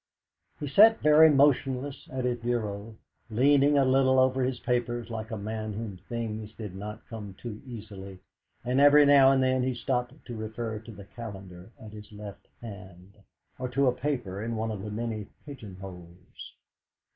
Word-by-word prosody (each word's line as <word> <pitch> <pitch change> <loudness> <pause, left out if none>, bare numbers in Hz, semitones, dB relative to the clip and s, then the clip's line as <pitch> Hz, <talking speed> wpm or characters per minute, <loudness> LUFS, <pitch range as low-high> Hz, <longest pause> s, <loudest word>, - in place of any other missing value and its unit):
He 145 - -4
sat 215 +11 +6
very 150 +1 +7
motionless 140 -1 +1
at 130 -1 -3
his 120 -1 -1
bureau, 110 -2 -3 0.3
leaning 140 +5 +4
a 135 - +4
little 130 0 +3
over 130 0 +3
his 125 -1 -1
papers 120 -1 -2
like 110 -1 -5
a 110 - -4
man 110 +1 -4
to - - -7
whom 110 -4 -5
things 110 -2 -4
do 110 -2 -7
not 105 +4 -8
come 105 -4 -8
too 110 -1 -8
easily; 100 -5 -9 0.5
and 125 +2 +1
every 145 +1 +7
now 140 -2 +7
and 135 -1 +3
then 130 0 +2
he 130 0 -1
stopped 125 +1 -2
to 120 - -7
refer 110 0 -5
to 115 +1 -12
the 100 -2 -11
calendar 95 -4 -10
at 110 - -11
his 105 0 -11
left 105 -2 -10
hand, 100 -4 -11 0.5
or 130 0 -3
to 140 +2 +1
a 125 - +4
paper 120 -9 -3
in 115 +1 -3
one 110 0 -2
of 105 -3 -5
the 105 - -6
many 110 -1 -4 0.2
pigeonholes. 95 - -11
115 Hz, 175 wpm, -28 LUFS, 105-130 Hz, 0.5 s, very